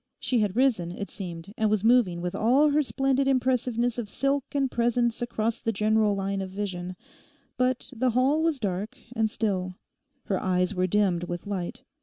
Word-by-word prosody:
She 250 - 0
had 205 -2 0
risen, 230 -10 +2
it 200 +3 -6
seemed, 180 -1 -7
and 220 -1 +3
was 210 -1 +1
moving 225 -7 +4
with 180 0 -3
all 270 +7 +4
her 300 +1 +3
splendid 270 -1 +1
impressiveness 245 -2 +1
of 215 -4 -4
silk 275 +2 0
and 270 -2 +1
presence 240 0 +1
across 230 -1 -1
the 225 - 0
general 215 0 +2
line 195 0 -2
of 190 - -4
vision. 185 -2 -4 0.6
But 255 +1 -1
the 255 +2 +1
hall 260 +6 +2
was 320 -4 +1
dark 200 0 -3 0.2
and 220 -1 +2
still; 185 -5 -2 0.5
her 195 - -1
eyes 180 +1 +1
were 185 -1 +1
dimmed 185 -3 +1
with 175 0 -5
light. 200 +4 -4
220 Hz, 180 wpm, -27 LUFS, 190-250 Hz, 0.6 s, moving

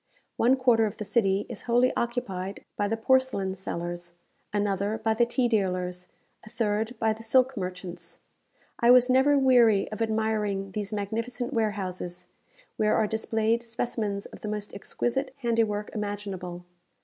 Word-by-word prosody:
One 245 +3 +4
quarter 240 -4 +3
of 205 - -7
the 210 - -5
city 195 -3 +2
is 235 - -7
wholly 245 +1 +3
occupied 200 -6 -3
by 205 - 0
the 225 +2 -1
porcelain 235 -5 +2
sellers, 175 -2 -5 0.4
another 205 +1 0
by 220 0 +1
the 235 +2 +2
tea 245 +1 +1
dealers, 180 -4 -1 0.4
a 215 - -12
third 220 0 -1
by 220 0 +2
the 220 - -11
silk 255 +3 +3
merchants. 180 -2 -6 0.6
I 235 - +4
was 250 0 +7
never 270 +3 +5
weary 240 -7 +5
of 215 - -5
admiring 215 -3 0
these 205 0 -4
magnificent 230 +5 -3
warehouses, 190 -6 -2 0.5
where 215 0 +3
are 220 - +3
displayed 220 +1 0
specimens 230 -3 -3
of - - -12
the - - -5
most 210 -1 -4
exquisite 260 +6 -2
handiwork 225 -3 0
imaginable. 195 -4 -5
215 Hz, 150 wpm, -27 LUFS, 195-235 Hz, 0.6 s, was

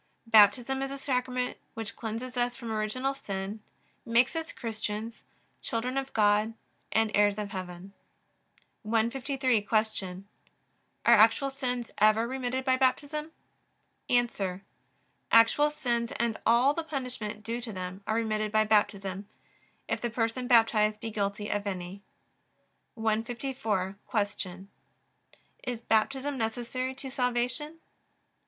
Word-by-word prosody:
Baptism 230 +4 +5
is 270 - -2
a 275 - -5
Sacrament 250 -2 -1 0.2
which 225 -1 -5
cleanses 235 +3 -5
us 245 0 0
from 230 -1 -6
original 220 +5 -1
sin, 200 -3 -5 0.4
makes 240 +4 +3
us 325 0 -3
Christians, 220 0 -5 0.4
children 245 +3 -2
of 270 0 -2
God, 210 +1 +3 0.4
and 220 -1 +2
heirs 205 0 +4
of 205 -1 -4
heaven. 185 0 -7 0.9
153. 245 +2 +1
Q. 205 -3 -1 0.8
Are - - +7
actual 225 +5 +5
sins 250 -3 -3
ever 215 +2 +5
remitted 260 0 -2
by 260 -1 +3
Baptism? 285 +4 0 0.8
A. 210 -7 +1 0.7
Actual 230 +6 +6
sins 240 -5 -1
and 235 -1 -1
all 245 +5 +5
the 330 - -3
punishment 250 -8 -4
due 235 +2 -3
to 230 -2 -6
them 185 0 -6
are 220 - +1
remitted 215 -2 0
by 215 0 +4
Baptism, 200 -2 +1 0.6
if - - -2
the 240 - -1
person 230 +2 -1
baptized 220 -3 +4
be 225 +1 -5
guilty 205 0 -2
of 205 0 -1
any. 185 0 -5 0.9
154. 220 -3 -1 0.4
Q. 185 +1 -7 1.0
Is 245 -2 -4
Baptism 265 +6 +1
necessary 245 +3 -2
to 265 0 -7
salvation? 250 +5 -1
230 Hz, 120 wpm, -29 LUFS, 210-255 Hz, 1.0 s, Are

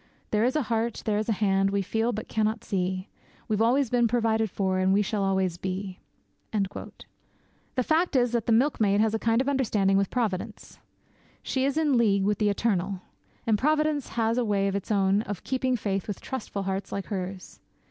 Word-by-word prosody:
There 215 0 +2
is 255 +4 +1
a 305 - +2
Heart, 230 0 -2
there 210 -1 +1
is 215 - -3
a - - +3
Hand, 195 -1 +2
we 200 0 0
feel 225 +5 0
but 215 -1 -5
cannot 220 0 -1
see 185 0 -2 0.4
We've 215 -1 0
always 245 +2 +3
been 240 -1 +3
provided 225 -2 +1
for, 190 0 -1
and 185 0 +2
we 205 +1 +3
shall 205 -1 -1
always 190 -3 0
be.' 185 0 -4 0.5
The 210 +4 -6
fact 320 +3 +1
is 245 -2 +3
that 235 -2 -1
the - - +2
milkmaid 220 -5 +3
has 220 0 +2
a 225 - 0
kind 230 +2 +2
of 265 - -3
understanding 210 -8 +2
with 195 -1 +1
Providence. 220 -3 -3 0.6
She 265 0 0
is 280 +2 0
in 295 -6 +3
league 200 -4 +3
with 205 0 +1
the 210 -1 +3
Eternal. 195 -3 0 0.4
And 215 -2 +2
Providence 305 -1 +1
has 230 +1 +2
a - - +2
way 200 -3 +1
of 195 - -1
its 200 - -4
own 200 -1 +3
of 205 -4 -6
keeping 260 -1 0
faith 195 -4 -2
with 205 - -4
trustful 215 -6 -5
hearts 195 0 -3
like 200 - -3
hers. 190 -2 -6
215 Hz, 200 wpm, -27 LUFS, 195-235 Hz, 0.6 s, a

